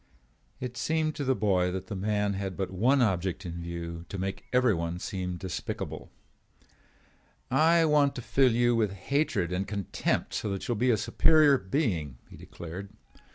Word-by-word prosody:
It 125 -1 -5
seemed 155 -1 0
to 145 - -2
the 130 -1 +2
boy 95 -4 +2
that 95 0 -4
the 105 - -6
man 105 +1 0
had 95 -1 -4
but 95 -2 -2
one 125 +8 +3
object 95 -2 -1
in 85 0 -5
view, 85 0 -6
to 100 - -5
make 95 +1 -4
everyone 95 -10 +2
seem 90 -1 -4
despicable. 95 0 -5 1.4
"I 165 +5 +5
want 150 -2 +3
to 125 - -6
fill 135 0 +3
you 120 +1 +3
with 105 -4 +1
hatred 100 - 0
and 95 +2 -1
contempt 100 -3 -2
so 105 - -2
that 100 -1 -4
you 120 - +1
will 110 - -4
be 125 +2 +3
a 115 - +4
superior 150 +4 +4
being," 95 - -1
he - - -13
declared. 90 +4 -8
100 Hz, 170 wpm, -28 LUFS, 90-125 Hz, 1.4 s, I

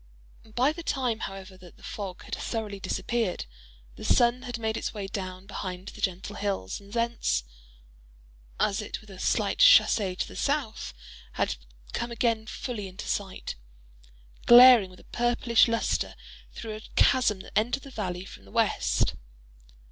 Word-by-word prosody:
By 260 +5 +3
the 340 - -7
time, 255 -8 -1
however, 195 -2 -7
that 180 -2 -15
the - - -20
fog 195 -3 -6
had - - -10
thoroughly 215 -3 -3
disappeared, 205 - -1 0.5
the - - -9
sun 240 +1 +3
had 245 -2 -5
made 220 -1 -2
its - - -3
way 205 -2 -4
down 185 -1 -6
behind 185 -2 -6
the - - -11
gentle 190 +2 -2
hills, 195 - -2
and 200 0 -16
thence, 230 - 0 1.2
as 200 - +1
if 210 - -5
with 215 -2 -15
a 190 - -11
slight - - 0
chassez 215 - +6
to - - -2
the - - -11
south, 275 - -2 0.4
had - - 0 0.4
come 235 - -2
again 230 -2 0
fully 215 -3 -5
into 190 +2 -8
sight, 195 -2 -3 0.9
glaring 240 -4 +9
with 185 - -15
a - - -23
purplish 240 -1 +3
lustre 230 0 0 0.4
through 220 -2 -6
a - - -11
chasm 210 -7 +4
that - - -14
entered 240 +5 +1
the 275 - -11
valley 185 -5 -4
from 95 - -12
the 95 - -16
west. - - +1
215 Hz, 160 wpm, -28 LUFS, 190-240 Hz, 1.2 s, glaring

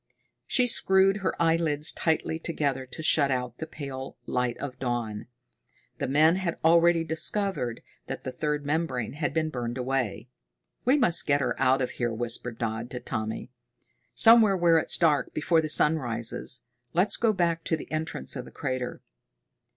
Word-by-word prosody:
She 250 - +2
screwed 195 -4 +3
her 190 -5 -3
eyelids 165 -2 +2
tightly 160 0 -1
together 140 -6 -2
to 160 - -7
shut 145 -3 +3
out 125 -2 -3
the 160 - -5
pale 135 -3 -7
light 125 -1 -1
of 130 -3 -7
dawn. 120 -4 -3 0.7
The - - -1
men 155 +6 +4
had 180 -3 -2
already 170 0 +5
discovered 160 - -1 0.2
that - - -6
the 130 - -4
third 150 +1 -2
membrane 145 -6 -2
had 150 +1 -2
been 160 -1 -1
burned 120 -1 -4
away. 125 -3 -2 0.6
"We 260 +4 +4
must 200 - +2
get 145 -1 +3
her 130 - 0
out 130 0 +3
of 125 - -3
here," 120 -1 -2
whispered 120 0 -2
Dodd 115 +1 -3
to 125 - -5
Tommy. 110 0 -5 0.6
"Somewhere 225 -4 +6
where 170 -2 +4
it's - - +2
dark, 155 -4 +1
before 160 +1 +2
the 155 - -4
sun 155 +1 +4
rises. 120 0 0 0.3
Let's 180 +5 +2
go 230 -2 +3
back 170 -4 0
to 160 - 0
the - - -11
entrance 155 -1 -3
of 125 -2 -5
the - - -11
crater." 130 -3 -4
150 Hz, 165 wpm, -27 LUFS, 125-165 Hz, 0.7 s, Somewhere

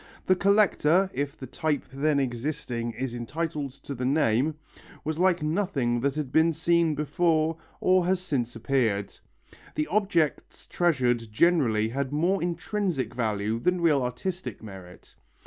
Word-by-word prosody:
The 185 - +4
collector, 195 -2 +3
if 140 0 -3
the 130 - -7
type 150 +3 -1
then 145 +1 +1
existing 120 -2 -3
is 125 +2 -4
entitled 145 +3 -4
to 140 - -5
the 125 -1 -5
name, 135 +1 +2 0.5
was 155 +1 -3
like 180 -2 +3
nothing 150 -8 0
that 140 +3 0
had 150 -4 -3
been 160 +2 +4
seen 165 0 +2
before 160 +1 +1 0.2
or 185 -1 +3
has 185 0 +2
since 130 -10 -2
appeared. 115 -5 0 0.6
The 150 - 0
objects 175 -4 0
treasured 125 -9 +1
generally 115 -6 +3
had 135 +2 -3
more 175 +6 +1
intrinsic 175 - -2
value 110 -2 -1
than 180 +8 +1
real 155 -5 +3
artistic 150 +7 -4
merit. 95 -4 -12
150 Hz, 140 wpm, -27 LUFS, 120-170 Hz, 0.6 s, The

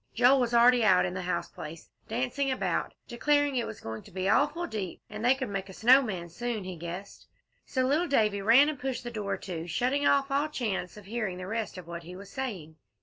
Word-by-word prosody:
Joel 250 +3 +5
was 245 -2 +1
already 240 0 +6
out 185 -4 +5
in 180 - -3
the 185 - -3
house 180 0 -2
place, 155 +1 -10 0.2
dancing 255 +4 -1
about, 260 - -1
declaring 290 +3 +1
it 240 - 0
was 220 - -8
going 110 0 -6
to - - -16
be 185 +1 -2
awful 295 - +2
deep, 205 - -5
and 215 +1 -6
they 250 +2 +5
could 260 -4 -4
make 195 -1 -4
a - - -9
snow 250 +7 +6
man 190 -9 -4
soon, 230 +3 -3
he 185 -1 -6
guessed; 175 +4 -8 0.4
so 260 - 0
little 305 +7 +2
Davie 210 -8 +2
ran 235 +8 +6
and 305 -3 -3
pushed 265 -2 -3
to 240 - -5
the - - -16
door, 200 -3 -3 0.3
shutting 255 - +1
off 275 0 +3
all 285 +2 +2
chance 210 -10 -3
of 210 - -12
hearing 210 -3 -3
the 185 - -6
rest 220 -1 -3
of 180 - -8
what 170 0 -7
he 175 +2 -10
was 195 +1 -11
saying. 190 - -5
225 Hz, 230 wpm, -29 LUFS, 185-260 Hz, 0.4 s, already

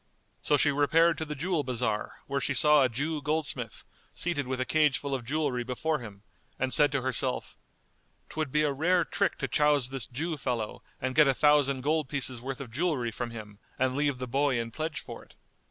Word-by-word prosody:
So 145 - +2
she 145 - +4
repaired 160 +4 +3
to 160 - -2
the 150 -1 -5
jewel 165 +1 -1
bazar, 120 -4 -3
where 140 -1 -2
she - - -1
saw 150 -1 +5
a 130 - +2
Jew 145 +6 -2
goldsmith 150 +1 -3 0.3
seated 155 -6 -1
with 130 0 -2
a 130 - 0
cage 150 -2 +3
full 140 -1 -4
of 130 -3 -2
jewellery 130 -2 -1
before 150 +6 -2
him, 105 -4 -11 0.3
and 130 0 0
said 145 -2 +6
to 140 -3 0
herself, 130 0 0 0.7
"'Twould 155 -3 -4
be 150 +2 +2
a 150 - +2
rare 175 +4 +2
trick - - 0
to - - -2
chouse 145 -4 +2
this 135 -3 -3
Jew 155 +6 -3
fellow 120 -6 -3 0.2
and 130 0 -2
get 150 +1 +5
a 135 - +3
thousand 145 -2 +3
gold 150 0 0
pieces 130 -4 +1
worth 130 +1 -5
of 130 -5 -8
jewellery 135 -4 -1
from 120 +2 -4
him 105 -3 -10 0.2
and 130 0 +1
leave 145 -2 +1
the 125 0 -5
boy 135 0 +1
in 115 0 -4
pledge 155 +4 -4
for - - -10
it." - - -22
140 Hz, 210 wpm, -28 LUFS, 125-150 Hz, 0.7 s, said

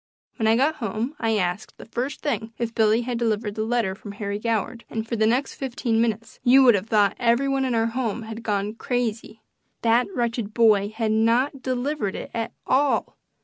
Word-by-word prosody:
When 220 - +1
I 220 - +5
got 290 +6 +2
home 225 +5 -3
I 225 -2 +1
asked, 180 +2 -2
the - - -11
first 250 +4 -4
thing, 230 -6 -2
if 235 -1 -3
Billy 220 +1 +3
had 240 -1 -3
delivered 220 -2 -1
the 215 - -3
letter 225 -4 0
from 200 +1 -9
Harry 200 0 -4
Goward, 230 +1 -2
and 225 0 -4
for 235 - -2
the 220 -1 +2
next 250 +5 +1
fifteen 240 -4 -1
minutes 225 -1 -2
you 265 +2 +6
would 245 -2 +7
have 200 +1 -1
thought 210 -3 +3
every 240 +3 +2
one 270 -1 +1
in 250 -2 0
our 225 0 +2
house 230 -1 -2
had 220 +1 -7
gone 210 -1 -1
crazy. 225 -2 -3 0.4
That 235 +1 +3
wretched 235 -3 -2
boy 210 -4 +4
had 220 0 -2
not 235 +5 +2
delivered 255 -4 -2
it - - -7
at 225 -1 -3
all! 280 +2 +1
230 Hz, 200 wpm, -24 LUFS, 215-245 Hz, 0.4 s, would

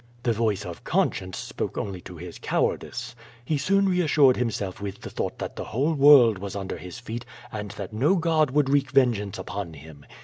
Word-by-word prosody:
The 120 - +2
voice 105 -3 0
of 85 -2 -8
conscience 95 -1 0
spoke - - -4
only 95 -3 -4
to 90 -1 -10
his 85 +1 -9
cowardice. - - -2 0.3
He 150 0 0
soon 195 +6 +3
reassured 155 -8 +4
himself 105 -6 -2
with 100 -2 -6
the - - -8
thought - - -3
that - - -5
the - - -4
whole 140 +8 0
world 135 -8 +7
was 100 0 -6
under 95 -1 -4
his 90 +4 -8
feet 120 0 -6 0.3
and 105 -2 -5
that 100 0 -6
no 140 - +3
god 160 -4 +2
would 145 +1 +2
wreak 140 0 +2
vengeance 120 -8 +2
upon 95 -2 -5
him. 75 0 -13
115 Hz, 195 wpm, -25 LUFS, 95-145 Hz, 0.3 s, world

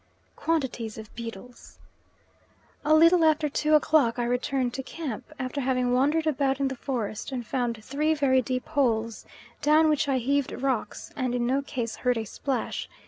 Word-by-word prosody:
Quantities 265 -8 -2
of 220 -1 -10
beetles. 235 +1 -9 1.1
A 305 +1 +4
little 335 +2 +6
after 310 -1 +3
two 305 +2 +2
o'clock 295 -6 +3
I 240 - 0
return 250 +1 0
to 265 - -4
camp, 270 -4 -6
after 270 +1 -3
having 250 -1 +1
wandered 295 +5 +2
about 275 -3 +1
in 275 -1 +1
the 265 - -4
forest 235 -4 -4
and 250 -3 -4
found 235 -2 -2
three 305 +4 +1
very 265 -3 +3
deep 255 +1 -3
holes, 230 -7 0 0.3
down 310 +1 +5
which 300 -2 +1
I 265 - +2
heaved 275 +2 0
rocks 260 -3 -3
and 255 -3 -1
in 240 -1 0
no 265 +3 +1
case 240 -5 -4
heard 250 -2 +1
a 225 - -2
splash. 265 +5 -3
260 Hz, 170 wpm, -27 LUFS, 245-295 Hz, 1.1 s, little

